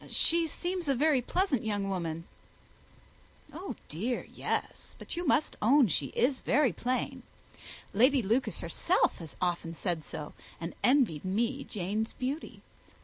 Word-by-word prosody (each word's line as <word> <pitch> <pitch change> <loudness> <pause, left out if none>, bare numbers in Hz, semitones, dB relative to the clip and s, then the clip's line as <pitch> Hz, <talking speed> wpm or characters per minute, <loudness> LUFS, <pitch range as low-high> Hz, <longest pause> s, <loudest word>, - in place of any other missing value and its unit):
"She 335 0 +4
seems 355 +2 -3
a 275 - +3
very 290 0 +3
pleasant 320 - 0
young 205 -2 -1
woman," 165 -4 -2 1.2
said - - -22
Bingley. 365 +5 -7
"Oh - - -3
dear, 225 +11 -2
yes; - - -3
but - - -7
you 350 0 -3
must 295 - +2
own 255 +1 +5
she 145 -3 0
is 255 +2 +2
very 270 - +3
plain. 250 +6 -2 0.7
Lady 255 +4 +4
Lucas 230 +7 0
herself - - +2
has 165 -4 -9
often 170 -2 -1
said 170 -3 -2
so, 150 0 -7 0.3
and 170 +1 -5
envied 245 - +3
me 235 +8 0
Jane's 210 +3 -2
beauty. 275 +5 -4
240 Hz, 145 wpm, -30 LUFS, 185-285 Hz, 1.2 s, own